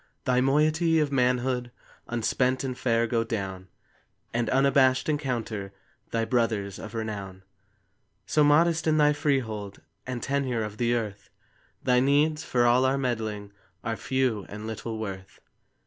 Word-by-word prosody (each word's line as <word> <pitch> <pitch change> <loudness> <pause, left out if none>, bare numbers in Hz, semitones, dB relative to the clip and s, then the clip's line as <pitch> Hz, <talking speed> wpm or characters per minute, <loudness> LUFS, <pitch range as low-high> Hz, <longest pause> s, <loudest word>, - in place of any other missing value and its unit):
Thy 125 0 +3
moiety 155 +4 +3
of 150 -2 +1
manhood 125 -1 +1 0.4
Unspent 125 +3 0
and 130 -2 -3
fair, 115 -2 +1
go 115 0 0
down, 95 -4 -4 0.7
And, 115 -1 0
unabashed, 135 -1 +3
encounter 115 -9 -2 0.4
Thy 115 0 0
brothers 110 -5 0
of 110 - -8
renown. 100 -4 -5 0.8
So 150 - +3
modest 165 +3 +3
in 155 -1 +3
thy 150 -1 +5
freehold 120 -9 -2 0.3
And 125 -2 -4
tenure 135 -5 0
of 105 0 -6
the 120 +1 +1
earth, 105 -4 -4 0.5
Thy 125 -1 +4
needs, 150 +4 +2
for 120 -1 +1
all 120 +2 +4
our 130 +1 +2
meddling, 110 -6 -3 0.3
Are 115 -1 -2
few 120 -2 -1
and 105 +1 -7
little 110 0 -5
worth. 95 -3 -7
120 Hz, 140 wpm, -27 LUFS, 110-135 Hz, 0.8 s, thy